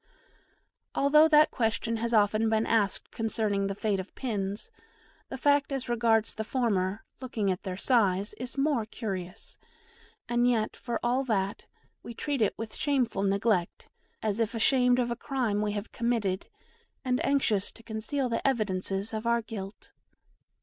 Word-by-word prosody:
Although 300 +3 +6
that 305 -1 +5
question 230 -1 0
has 235 +1 -2
often 215 0 +3
been 220 0 +2
asked 215 -3 +1
concerning 215 -3 -1
the 195 - -3
fate 205 -1 0
of 190 - -8
pins, 205 -5 -3 0.6
the 265 - -5
fact 285 +1 +2
as 270 -2 -3
regards 230 -2 +2
the 220 - -4
former, 210 -5 0 0.2
looking 225 -6 -1
at 185 - -3
their 185 -2 -5
size, 200 -4 +2
is 250 +2 -6
more 275 -6 +1
curious 195 -4 -6 0.7
and 240 +1 +2
yet, 225 -3 0
for 235 -2 -4
all 250 +3 +2
that, 200 -4 -1 0.3
we 235 - -9
treat 285 -1 -2
it 210 - +1
with 225 -1 -6
shameful 255 -8 0
neglect, 200 -2 0 0.3
as 215 0 0
if 230 0 0
ashamed 250 +1 +3
of 240 -1 0
a - - -1
crime 240 -5 -1
we 210 -1 -1
have 205 +1 -5
committed 225 -6 -1 0.6
and 250 0 +1
anxious 225 -8 +1
to 230 - -17
conceal 230 +5 -2
the 235 +3 -1
evidences 200 -3 -1
of 220 +1 -3
our 235 0 +2
guilt. 200 -2 -8
225 Hz, 155 wpm, -29 LUFS, 205-245 Hz, 0.7 s, Although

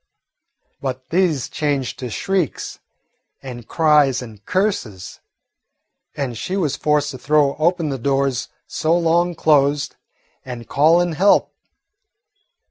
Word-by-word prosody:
But 130 -1 -5
these 165 -7 +1
changed 145 -4 -2
to 125 - -5
shrieks 180 - -2 0.6
and 120 -3 -8
cries 150 -5 +3
and 110 -4 -12
curses, 185 - -2 1.0
and 135 -4 -3
she 180 - -3
was 150 -7 0
forced 150 -1 +1
to 130 - -9
throw 145 +1 +2
open 165 0 +1
the 135 -2 -3
doors 135 0 0 0.2
so 160 +2 0
long 170 +1 +2
closed 145 -2 +2 0.5
and 120 -3 -8
call 160 +5 +4
in 175 -1 0
help. 190 +6 +3
145 Hz, 120 wpm, -20 LUFS, 130-165 Hz, 1.0 s, call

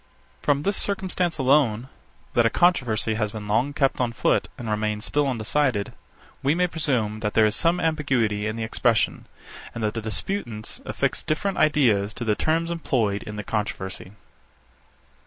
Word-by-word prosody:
From 145 0 +1
this 200 +2 +1
circumstance 185 -4 -1
alone, 130 -4 +3 0.5
that 120 - +4
a - - +2
controversy 120 - +2
has 105 -1 -1
been 105 -1 -7
long 115 +7 +1
kept 135 -2 +1
on 120 -2 0
foot, - - +1
and 120 - -6
remains 105 0 -1
still 145 -1 +1
undecided, 125 -2 0 0.5
we 140 +3 +2
may 180 +1 +3
presume 130 -11 -1
that 105 -1 -3
there 110 - +6
is 105 0 +1
some 170 +1 +2
ambiguity 130 -10 0
in 110 - -3
the 115 - -3
expression, 115 0 +1 0.5
and 115 - -4
that 105 - 0
the 115 - -3
disputants 110 - -3
affix - - -1
different 195 +6 -1
ideas 115 -9 +3
to 120 - -4
the 110 - +3
terms 165 +8 0
employed 115 -11 0
in 105 -2 -7
the 105 - -5
controversy. 95 -3 -4
120 Hz, 165 wpm, -24 LUFS, 105-150 Hz, 0.5 s, there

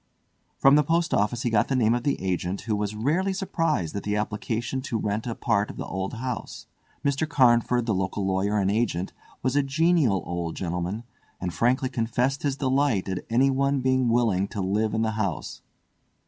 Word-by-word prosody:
From 135 - +5
the 150 +1 +6
post 165 +2 +1
office 105 +4 +1
he 120 - 0
got 110 0 +3
the 135 - 0
name 115 -3 +3
of 120 - 0
the 140 +3 0
agent, 90 0 -2
who 110 -2 -1
was 105 0 -2
rarely 165 - 0
surprised 165 - -1
at 100 - -2
the 105 +1 -2
application 110 +4 -2
to 130 -3 -3
rent 105 +2 -2
a 115 - -3
part 105 -3 0
of - - -9
the - - -4
old 95 +4 -4
house. 125 +1 -5 0.4
Mr. 140 +2 0
Carnford, 120 -3 +3
the 110 - +1
local 95 +1 -1
lawyer 95 +2 +1
and 100 -1 +2
agent, 100 -5 -1 0.3
was 130 +1 0
a 145 - +5
genial 140 - +2
old 85 -1 -3
gentleman, 90 +4 -3 0.4
and 90 -2 -3
frankly 125 - +2
confessed 125 +2 -1
his 140 -2 -1
delight 135 -7 +1
at 95 -1 -3
anyone 135 +3 +2
being 130 -1 +2
willing 110 -5 +2
to 105 - -6
live 105 +3 0
in 110 - +1
the 110 - 0
house. 100 -6 -3
115 Hz, 190 wpm, -26 LUFS, 100-135 Hz, 0.4 s, the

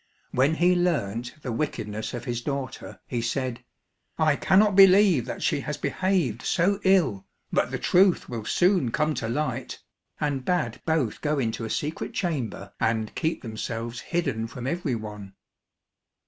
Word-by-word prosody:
When 135 +5 +2
he 175 +2 +4
learnt 125 - -1
the 125 - -3
wickedness 110 -4 -3
of 120 - -6
his 120 -2 -2
daughter 140 0 -5
he 120 -2 -2
said, 125 +1 -2 0.5
"I 155 -2 +3
cannot 200 +5 +4
believe 195 - +6
that - - -5
she - - +1
has - - -4
behaved 175 - 0
so 195 +7 +1
ill, 155 - +3 0.3
but - - +2
the - - -3
truth 185 0 +3
will 115 -3 -5
soon 180 - +2
come 155 +5 +1
to 110 -5 -3
light," 130 -1 -2 0.4
and 145 -3 -1
bade 180 +5 -1
both 160 -9 0
go 150 0 0
into 115 -3 -1
a - - -5
secret 150 +7 -3
chamber 125 - -3
and 110 -1 0
keep 160 0 -2
themselves 115 +1 -4
hidden 135 -9 -2
from 120 +2 -8
every 145 -2 -1
one. 105 -3 -8
135 Hz, 155 wpm, -26 LUFS, 115-170 Hz, 0.5 s, believe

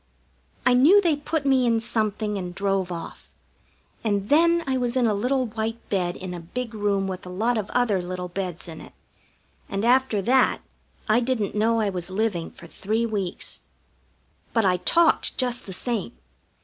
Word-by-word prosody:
I 250 - +5
knew 295 +12 +7
they 340 -6 +2
put 290 +1 -3
me 260 -2 +3
in 230 -1 +3
something 215 -2 -1
and 180 -2 -5
drove 195 -2 0
off, 170 -1 -8 0.7
and 205 -2 -1
then 335 +3 +4
I 265 -2 0
was 250 0 0
in 250 - +3
a 220 - +2
little 255 +6 0
white 225 0 -3
bed 180 -3 0
in 185 -1 -6
a 175 - -5
big 230 +8 -5
room 205 -2 0
with 185 -1 -5
a 180 - -9
lot 220 +7 0
of 215 -3 -2
other 230 -7 +1
little 180 0 -5
beds 180 -1 -5
in 160 -1 -8
it; - - -13 0.8
and 200 +3 -2
after 250 -3 +3
that 255 +3 +3 0.5
I 215 +2 +4
didn't 240 -5 -1
know 225 +2 +2
I 205 -2 0
was 180 -1 -5
living 190 -4 -1
for - - -14
three 215 +7 -2
weeks. 200 -5 -2 0.9
But 225 -3 +2
I 180 -1 +3
talked 335 - +2
just 250 -3 -1
the - - -6
same. 205 - -2
215 Hz, 180 wpm, -24 LUFS, 190-250 Hz, 0.9 s, knew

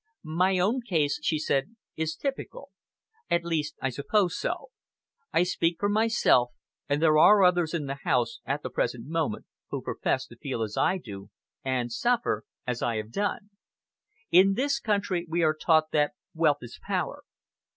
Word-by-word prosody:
"My 180 +4 +1
own 215 +8 +1
case," 160 - 0
she 155 0 +1
said, 150 +6 -1 0.2
"is 160 0 -2
typical. 275 - -5 0.6
At 170 0 +1
least 155 -2 -1
I 130 - +2
suppose 175 - +1
so! - - -3 0.6
I - - +3
speak 175 -1 0
for 205 - +1
myself; 215 - +3 0.4
and 145 +1 +1
there 155 -1 +5
are 205 +4 +7
others 175 -2 +3
in 150 -3 -2
the 140 0 -5
house, 115 -2 +1
at 140 +3 -3
the - - -5
present 120 -1 -2
moment, 160 -6 -2 0.2
who - - -3
profess - - -1
to - - -14
feel 115 - -3
as 105 -1 -5
I 190 - +2
do, 100 - -9 0.3
and 125 -2 -1
suffer 235 - 0 0.2
as 125 -1 -3
I 120 -2 0
have 110 0 -4
done. 205 - -2 0.8
In 190 +3 +6
this 275 +3 0
country, 200 -6 -1
we 170 +1 +1
are 155 -1 +4
taught 155 0 +2
that 150 -1 +2 0.2
wealth 155 -4 +2
is 120 - -10
power. - - -2
160 Hz, 170 wpm, -27 LUFS, 135-190 Hz, 0.8 s, are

